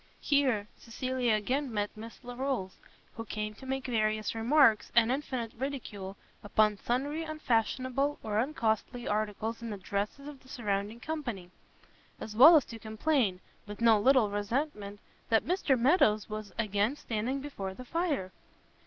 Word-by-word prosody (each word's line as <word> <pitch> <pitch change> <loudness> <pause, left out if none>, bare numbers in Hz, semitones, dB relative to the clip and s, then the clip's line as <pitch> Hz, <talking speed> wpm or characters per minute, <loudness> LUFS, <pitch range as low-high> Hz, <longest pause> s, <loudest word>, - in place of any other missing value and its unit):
Here 260 -8 +2
Cecilia 245 0 -1
again 255 +6 -1
met 205 -1 -2
Miss 225 +4 -10
Larolles, 245 -5 -3 0.4
who 225 - -5
came 215 -1 -4
to 265 +5 -12
make 265 0 -2
various 215 -3 0
remarks, 230 0 +4
and 235 0 +5
infinite 255 -4 -3
ridicule, 225 -7 -5 0.3
upon 210 0 +2
sundry 280 +6 -1
unfashionable 275 -1 0
or 210 -1 0
uncostly 235 -2 -1
articles 215 +2 -2
in 230 - -5
the 205 - -4
dresses 205 +8 -3
of 290 -2 -9
the 260 - -21
surrounding 210 -1 -2
company; 240 - -5 0.7
as 215 - -7
well 300 +9 +10
as 295 - +5
to 230 - -9
complain, 220 -3 0 0.3
with 205 0 -8
no 230 -2 +5
little 245 -2 +4
resentment, 205 -1 -2 0.3
that 225 -1 +3
Mr 335 -7 +2
Meadows 235 - +3
was 215 -1 -6
again 215 +3 +1
standing 245 0 -2
before 200 -10 -6
the 255 - -9
fire! 300 - -1
230 Hz, 145 wpm, -30 LUFS, 210-270 Hz, 0.7 s, well